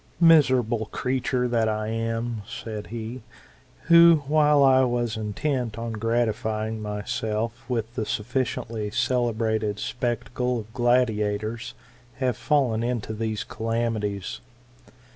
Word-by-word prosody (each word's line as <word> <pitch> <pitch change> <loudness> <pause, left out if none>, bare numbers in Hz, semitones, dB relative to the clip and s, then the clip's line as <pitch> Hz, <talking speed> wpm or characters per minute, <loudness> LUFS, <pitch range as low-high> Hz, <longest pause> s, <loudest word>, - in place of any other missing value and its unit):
'* - - -31
Miserable 125 -7 +3
creature 125 0 -1
that 115 -2 +1
I 110 0 -2
am! 115 0 -2
said 110 -2 -6
he: 115 +2 -6 0.6
who, 170 -2 +7
while 150 0 +4
I 130 -1 +6
was 120 -2 0
intent 115 +2 -2
on 115 0 -4
gratifying 110 -1 -1
myself 110 +3 -3
with 115 -2 -2
the 110 -3 -3
sufficiently 115 -2 -2
celebrated 110 -3 0
spectacle 120 +2 -2
of 110 +1 -16
gladiators, 110 -3 0 0.4
have 130 -4 0
fallen 130 -7 +1
into 120 -2 -2
these 110 -1 -2
calamities. 110 -4 -2
115 Hz, 110 wpm, -25 LUFS, 110-125 Hz, 0.6 s, who